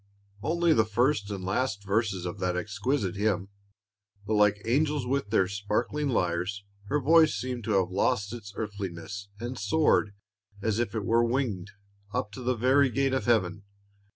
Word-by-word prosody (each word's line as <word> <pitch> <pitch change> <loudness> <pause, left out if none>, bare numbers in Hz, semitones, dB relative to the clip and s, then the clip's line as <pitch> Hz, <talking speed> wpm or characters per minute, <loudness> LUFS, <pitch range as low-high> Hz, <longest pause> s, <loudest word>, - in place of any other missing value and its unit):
Only 170 +5 +2
the 110 - +4
first 110 0 +1
and 100 -2 -5
last 105 +2 -1
verses 100 -3 0
of 90 +3 -5
that 90 -1 0
exquisite 100 +2 -1
hymn; 100 -2 0 0.8
but 110 - -1
like 105 -1 +4
"angels 145 +3 +1
with 135 -4 -1
their 95 -2 +3
sparkling 105 +9 -1
lyres," 90 -1 -1 0.2
her 145 +8 0
voice 160 -1 +5
seemed 120 +1 -4
to 110 - 0
have 95 -1 -1
lost 105 +2 0
its 110 -4 -8
earthliness, 100 -2 -5
and 120 +3 -5
soared, 150 -10 +2 0.4
as 110 +1 0
if 120 -1 -1
it 105 -3 -2
were 115 +1 +3
winged, 115 -6 -1 0.5
up 105 - -1
to 115 - -8
the 125 +1 0
very 130 +4 +4
gate 135 +2 +1
of 130 - 0
heaven. 105 -5 +2
110 Hz, 165 wpm, -28 LUFS, 100-130 Hz, 0.8 s, voice